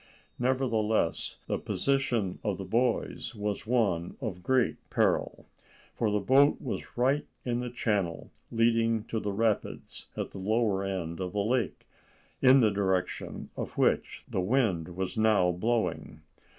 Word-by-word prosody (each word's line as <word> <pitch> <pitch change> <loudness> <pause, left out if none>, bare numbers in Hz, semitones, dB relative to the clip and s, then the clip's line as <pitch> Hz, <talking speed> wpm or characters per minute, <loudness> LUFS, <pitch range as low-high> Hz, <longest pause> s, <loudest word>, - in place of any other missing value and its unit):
Nevertheless, 115 -7 +1
the - - -2
position 130 -9 0
of - - -1
the - - -5
boys 120 0 0
was 105 0 -3
one 100 -9 +1
of 105 -9 -4
great 130 +5 +2
peril, - - +1 0.5
for 110 - 0
the 105 0 +1
boat 135 +8 +4
was 130 - -6
right 135 +4 +2 0.2
in 120 -1 0
the 125 0 -3
channel 105 -8 -1 0.2
leading 115 -1 +2
to 115 0 -3
the 105 - -2
rapids 110 +1 -2
at - - -3
the 100 - -8
lower 105 -1 +1
end 90 -4 -3
of 90 0 -4
the 100 -1 0
lake, 115 -3 -1 0.6
in 130 +1 +7
the 110 -3 +4
direction 95 -2 -2
of - - -6
which - - +1
the 95 - -1
wind 90 -6 +1
was 95 +3 -2
now 105 -5 +4
blowing. 110 +6 -1
110 Hz, 145 wpm, -29 LUFS, 95-120 Hz, 0.6 s, in